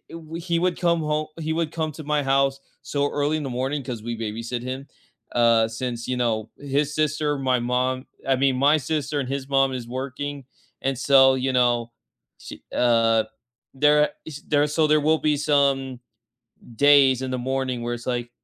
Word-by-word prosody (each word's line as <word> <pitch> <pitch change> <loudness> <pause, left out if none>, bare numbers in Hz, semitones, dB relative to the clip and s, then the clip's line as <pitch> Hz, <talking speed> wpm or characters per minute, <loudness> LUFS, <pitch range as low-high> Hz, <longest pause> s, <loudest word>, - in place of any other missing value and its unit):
w 165 0 -8
he 170 -1 -1
would 180 0 0
come 170 -2 +2
ho 150 0 -1
he 160 0 -2
would 160 -1 -1
come 160 -2 -2
to 155 - -9
my 150 0 0
house 135 0 +1 0.2
so 145 0 -1
early 145 +2 0
in 155 - -3
the 135 - -4
morning 135 +4 -2
'cause 120 -4 -6
we 120 +1 -4
babysit 115 +2 -4
him, 130 +2 -5 0.5
uh, 115 -2 +4
since, 120 +1 -5
you 130 - -1
know, 115 -3 -1
his 145 +1 -1
sister, 150 -1 0
my 130 -2 +1
mom, 125 +2 -1 0.2
I 135 - +3
mean, 135 0 +2
my 140 +4 +4
sister 145 0 -2
and 130 - -4
his 135 0 -4
mom 135 -1 +3
is 120 -2 -5
working. 135 +2 -5 0.4
And 135 -1 -1
so, 135 0 +5
you 130 0 -1
know, 120 -2 +1 0.5
she, - - -10
uh, 115 -2 +3 0.5
there 150 +2 +4 0.2
ish 150 -2 -8
there 145 0 +2
so 155 +1 +1
there 150 0 +3
will 155 +2 +3
be 150 -1 +1
some 140 -3 +1 0.8
days 140 -1 +5
in 130 - -3
the 130 - 0
morning 130 -1 -2
where 120 0 -2
it's 120 0 -9
like, 120 -1 -2
135 Hz, 190 wpm, -23 LUFS, 125-150 Hz, 0.8 s, so